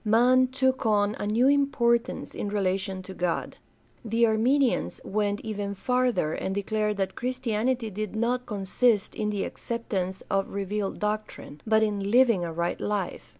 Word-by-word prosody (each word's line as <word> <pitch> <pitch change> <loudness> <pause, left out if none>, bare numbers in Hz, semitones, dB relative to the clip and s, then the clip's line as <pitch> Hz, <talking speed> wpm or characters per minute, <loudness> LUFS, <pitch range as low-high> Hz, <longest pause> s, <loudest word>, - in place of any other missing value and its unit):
Man 245 +4 +4
took 260 +1 0
on 210 -2 +2
a 205 - -2
new 230 +5 +3
importance 260 -4 +1
in 205 - -3
relation 190 -1 -1
to 190 - -9
God. 180 -2 -2 0.5
The 230 +1 +2
Arminians 240 +4 +2
went 205 0 -1
even 205 -2 -4
farther 250 -7 +1
and 190 - -3
declared 210 +1 -1
that 190 -1 -1
Christianity 245 -1 -1
did 215 +1 -4
not 245 +3 0
consist 210 +1 +1
in 210 -1 -2
the 205 -2 -1
acceptance 195 -5 -4
of 195 0 0
revealed 200 0 -3
doctrine, 210 -8 -4
but 220 0 +4
in 200 -2 -1
living 230 -5 +4
a 170 - -3
right 170 +1 -2
life. 205 -3 -3
215 Hz, 150 wpm, -27 LUFS, 195-240 Hz, 0.5 s, Man